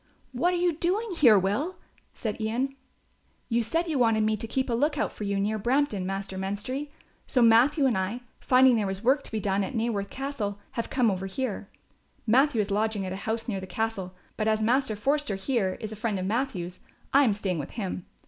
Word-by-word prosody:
"What 315 Hz, +8 st, +1 dB
are 360 Hz, -, 0 dB
you 350 Hz, -1 st, +2 dB
doing 385 Hz, +7 st, 0 dB
here, 240 Hz, -10 st, +7 dB
Will?" 210 Hz, -, 0 dB, 0.4 s
said 220 Hz, -1 st, -4 dB
Ian. 250 Hz, +5 st, -1 dB, 0.7 s
"You 235 Hz, 0 st, +2 dB
said 330 Hz, +10 st, -1 dB
you 305 Hz, -5 st, 0 dB
wanted 225 Hz, -3 st, +3 dB
me 215 Hz, 0 st, +2 dB
to 220 Hz, +2 st, -6 dB
keep 260 Hz, +3 st, -1 dB
a 240 Hz, -, -1 dB
look 295 Hz, +6 st, +1 dB
out -, -, 0 dB
for 210 Hz, -, -6 dB
you 200 Hz, 0 st, 0 dB
near 215 Hz, +2 st, 0 dB
Brampton, 235 Hz, -4 st, +1 dB
Master 195 Hz, 0 st, -4 dB
Menstrie; 205 Hz, +9 st, -3 dB, 0.4 s
so 255 Hz, -, +1 dB
Matthew 250 Hz, +6 st, +5 dB
and 250 Hz, -4 st, +3 dB
I, 190 Hz, +6 st, -2 dB, 0.2 s
finding 255 Hz, -1 st, +5 dB
there 210 Hz, -2 st, 0 dB
was 190 Hz, +2 st, -4 dB
work 265 Hz, +4 st, +4 dB
to -, -, -10 dB
be 220 Hz, -, -1 dB
done 200 Hz, -1 st, 0 dB
at 255 Hz, -, -5 dB
Naworth 220 Hz, -3 st, -1 dB
Castle, 265 Hz, -7 st, -3 dB
have 230 Hz, -, -3 dB
come 245 Hz, -5 st, +2 dB
over 190 Hz, 0 st, -3 dB
here. 205 Hz, -1 st, -4 dB, 0.6 s
Matthew 245 Hz, +1 st, +4 dB
is 205 Hz, 0 st, -3 dB
lodging 210 Hz, -1 st, 0 dB
at 185 Hz, -, -4 dB
a 195 Hz, -, -7 dB
house 225 Hz, +2 st, -2 dB
near 200 Hz, -5 st, -2 dB
the 190 Hz, -, -8 dB
castle, 195 Hz, -2 st, -3 dB, 0.2 s
but 215 Hz, -, 0 dB
as 215 Hz, 0 st, +2 dB
Master 245 Hz, 0 st, +2 dB
Forster, 275 Hz, +1 st, 0 dB
here, 195 Hz, -2 st, -1 dB
is 215 Hz, -, -5 dB
a -, -, -6 dB
friend 215 Hz, -1 st, -2 dB
of 185 Hz, -, -3 dB
Matthew's, 195 Hz, -6 st, -2 dB, 0.3 s
I 280 Hz, +1 st, +7 dB
am 230 Hz, -6 st, +3 dB
staying 190 Hz, -5 st, -2 dB
with 145 Hz, -, -5 dB
him. 185 Hz, -4 st, -4 dB
220 Hz, 215 wpm, -27 LUFS, 200-265 Hz, 0.7 s, here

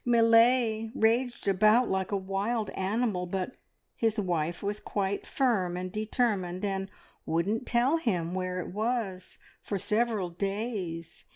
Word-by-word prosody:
Millais 230 Hz, -1 st, +4 dB
raged 240 Hz, +1 st, +1 dB
about 215 Hz, +5 st, +4 dB
like 190 Hz, 0 st, -1 dB
a 200 Hz, -, +1 dB
wild 195 Hz, +4 st, -2 dB
animal, 195 Hz, -1 st, -1 dB
but 190 Hz, +5 st, -2 dB, 0.4 s
his 225 Hz, -1 st, 0 dB
wife 170 Hz, -3 st, -1 dB
was 205 Hz, +1 st, -2 dB
quite 200 Hz, 0 st, -2 dB
firm 195 Hz, -10 st, +1 dB
and 185 Hz, 0 st, -4 dB
determined, 210 Hz, -4 st, -1 dB
and 195 Hz, -1 st, -2 dB, 0.3 s
wouldn't 200 Hz, +9 st, -1 dB
tell 250 Hz, +6 st, +3 dB
him 180 Hz, -, -1 dB
where 185 Hz, -1 st, -2 dB
it 180 Hz, -, -6 dB
was 215 Hz, -4 st, -2 dB, 0.2 s
for 200 Hz, -, -3 dB
several 210 Hz, -2 st, 0 dB
days. 195 Hz, -3 st, -4 dB
205 Hz, 130 wpm, -29 LUFS, 185-230 Hz, 0.4 s, Millais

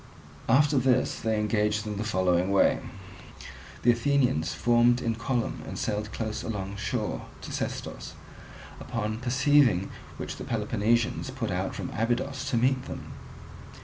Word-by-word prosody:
After 140 Hz, +3 st, +5 dB
this 130 Hz, 0 st, +2 dB
they 110 Hz, -2 st, 0 dB
engaged 105 Hz, 0 st, +1 dB
in 105 Hz, -1 st, -4 dB
the 105 Hz, -, -2 dB
following 95 Hz, -3 st, +1 dB
way. 100 Hz, -, +4 dB, 1.0 s
The 120 Hz, -, +6 dB
Athenians 120 Hz, -, +1 dB
formed 120 Hz, +1 st, +3 dB
in 115 Hz, -2 st, 0 dB
column 115 Hz, +1 st, -2 dB
and -, -, -6 dB
sailed 105 Hz, 0 st, -2 dB
close 110 Hz, -2 st, -3 dB
alongshore 105 Hz, +1 st, -3 dB, 0.2 s
to -, -, -7 dB
Sestos; -, -, -5 dB, 0.6 s
upon 110 Hz, -2 st, -3 dB
perceiving 130 Hz, -5 st, +3 dB, 0.3 s
which -, -, -5 dB
the -, -, -6 dB
Peloponnesians 115 Hz, +3 st, 0 dB
put 125 Hz, -6 st, -3 dB
out 90 Hz, +2 st, -2 dB
from 95 Hz, -, -5 dB
Abydos 120 Hz, +4 st, -1 dB
to 120 Hz, -, +1 dB
meet 130 Hz, +2 st, +2 dB
them. -, -, -7 dB
115 Hz, 135 wpm, -28 LUFS, 105-125 Hz, 1.0 s, The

